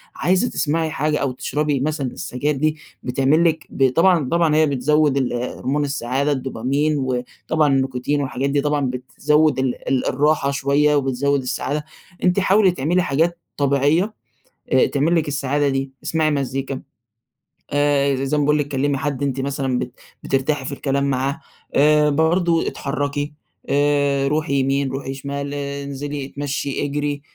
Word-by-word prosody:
عايزة 185 +7 +1
تسمعي 160 +1 0
حاجة 150 +1 0
أو 135 -2 -1
تشربي 145 +2 -1
مثلًا 145 0 -1
السجاير 145 +4 -2
دي 155 +3 0 0.3
بتعمل 135 +6 +2
لِك 160 -2 +1
ب 135 -1 +2
طبعًا 165 -1 +3
طبعًا 165 -2 +2
هي 155 - +5
بتزود 145 +1 +2
ال 130 -2 0
هُرْمون 130 +4 -2
السعادة 140 +1 -1
الدوبامين، 135 +3 0
وطبعًا 130 +4 -1
النيكوتين 135 +2 0
والحاجات 135 0 -2
دي 140 0 +1
طبعًا 145 -1 0
بتزود 140 +4 +1
ال 130 -2 -2
ال 130 -2 +1
الراحة 145 0 +2
شوية 140 +2 +2
وبتزود 140 0 +1
السعادة، 145 +3 -3 0.4
أنتِ 180 +1 +3
حاولي 195 0 +4
تعملي 175 +3 +1
حاجات 165 +4 0 0.2
طبيعية، 145 +8 +2 0.6
آآ، 130 - +5
تعمل 150 +4 +1
لِك 160 -2 +1
السعادة 145 0 0
دي، 135 0 -2
اسمعي 155 0 +1
مزيكا، 135 -1 -2 0.9
آآ، 145 -1 +2
ز 130 - -3
زي 135 +2 0
ما 145 - +2
باقول 150 +1 +3
لِك، 145 - -1
كلمي 140 0 0
حد 140 0 -2
أنتِ 135 -1 -1
مثلًا 135 -2 -1
بت 125 - -4 0.3
بترتاحي 135 +1 0
في 145 - -4
الكلام 140 0 -1
معاه، 135 +1 -1 0.3
آآ، 150 +1 +5
برضو 165 +3 +2
اتحركي، 145 +1 -3 0.4
آآ، 140 -1 +2
روحي 150 0 0
يمين، 135 +1 +1
روحي 135 0 -4
شمال، 140 +1 -5
إنزلي 140 0 -4
إتمشي، 140 0 -3
إجري، 145 0 -2
140 Hz, 150 wpm, -21 LUFS, 135-150 Hz, 0.9 s, هي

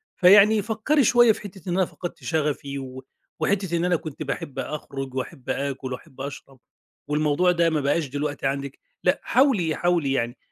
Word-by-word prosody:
فيعني 205 +3 +6
فكّري 230 +8 +1
شويّة 240 -1 +6
في - - -4
حتّة 190 -3 -9
إن - - 0
أنا 190 - +3
فقدت 175 +1 -8
شغفي 145 -3 -2
و 130 0 -8 0.4
وحتّة 190 -4 0
إن 170 - 0
أنا 180 -1 +2
كنت 155 -1 -5
باحب 140 -1 -5
أخرج، 135 -3 -5
وأحب 130 0 -6
آكل، 135 -2 -2
وأحب 130 +1 -10
أشرب، 135 -2 -8 0.5
والموضوع 150 +4 +2
ده 170 -1 +2
ما 155 -2 0
بقاش 145 +2 +1
دلوقتي 145 +1 -2
عندِك، 140 0 -4 0.2
لأ - - +2
حاولي، 215 - +2
حاولي 175 -6 +1
يعني. 120 -1 -1
155 Hz, 170 wpm, -24 LUFS, 140-180 Hz, 0.5 s, فيعني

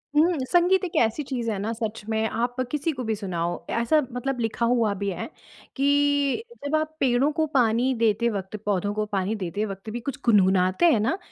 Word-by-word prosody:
हुँ, 330 +2 +4
संगीत 360 +2 +4
एक 345 - -7
ऐसी 230 +6 0
चीज़ 245 -4 -3
है 205 - -2
ना 215 +3 -2
सच 220 -1 -4
में 220 0 +1
आप 240 +1 -2 0.2
किसी 300 +2 0
को 255 -4 -5
भी 220 - -1
सुनाओ, 175 -4 -3 0.2
ऐसा 235 +7 +3
मतलब 250 +1 -3
लिखा 225 +1 -1
हुआ 230 -3 +2
भी 200 +1 -2
है, 180 - -4 0.5
कि, 285 - +2 0.2
जब 285 - 0
आप 310 0 -1
पेड़ों 265 +3 +2
को 315 - +3
पानी 245 +1 +3
देते 230 +1 +2
वक़्त, 195 -2 -5
पौधों 205 0 0
को 215 0 -1
पानी 200 0 -1
देते 205 +1 -3
वक़्त 195 +1 -7
भी 235 +3 -4
कुछ 275 +3 -5
गुनगुनाते 190 - +4
हैं 225 - +2
ना, 250 - 0
230 Hz, 200 wpm, -25 LUFS, 210-280 Hz, 0.5 s, हुँ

